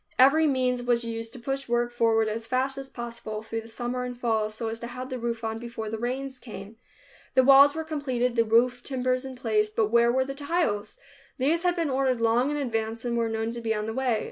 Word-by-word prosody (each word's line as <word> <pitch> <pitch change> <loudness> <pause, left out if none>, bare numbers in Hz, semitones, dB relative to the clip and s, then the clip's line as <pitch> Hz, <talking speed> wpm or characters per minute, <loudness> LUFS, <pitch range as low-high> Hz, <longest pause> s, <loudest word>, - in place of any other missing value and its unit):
Every 290 +5 +6
means 255 -3 +1
was 240 -1 +1
used 225 0 -4
to - - -7
push 270 +1 -4
work 240 0 +1
forward 225 -2 +2
as 225 +1 -4
fast 265 +1 0
as 270 0 -8
possible, 230 -3 -6
through 225 +1 -4
the 225 - -13
summer 240 +2 -3
and 245 -1 -6
fall, 220 -3 +1
so 220 +2 -5
as 225 +1 -4
to 235 - -6
have 255 +2 -7
the 255 - -3
roof 235 -1 -3
on 225 0 -3
before 230 -2 -6
the 225 - -3
rains 260 +2 -3
came. 215 -2 -10 0.6
The 260 - +6
walls 275 +2 +7
were 320 - -2
completed, 260 -6 -1
the 230 - +4
roof 240 +2 +3
timbers 255 0 -1
in 265 -1 -7
place, 215 -4 +1
but 215 0 0
where 235 0 +5
were 260 +1 +1
the 275 - -5
tiles? 280 -8 -1 0.4
These 300 +6 +2
had 355 0 +1
been 330 -5 -1
ordered 260 -2 +1
long 230 +4 +2
in 295 - -1
advance, 225 -4 -2
and 240 -1 -1
were 230 -1 +1
known 225 0 -2
to 235 0 -6
be 225 -1 0
on 210 0 -2
the 220 - -3
way. 250 -3 +1
240 Hz, 240 wpm, -27 LUFS, 225-260 Hz, 0.6 s, walls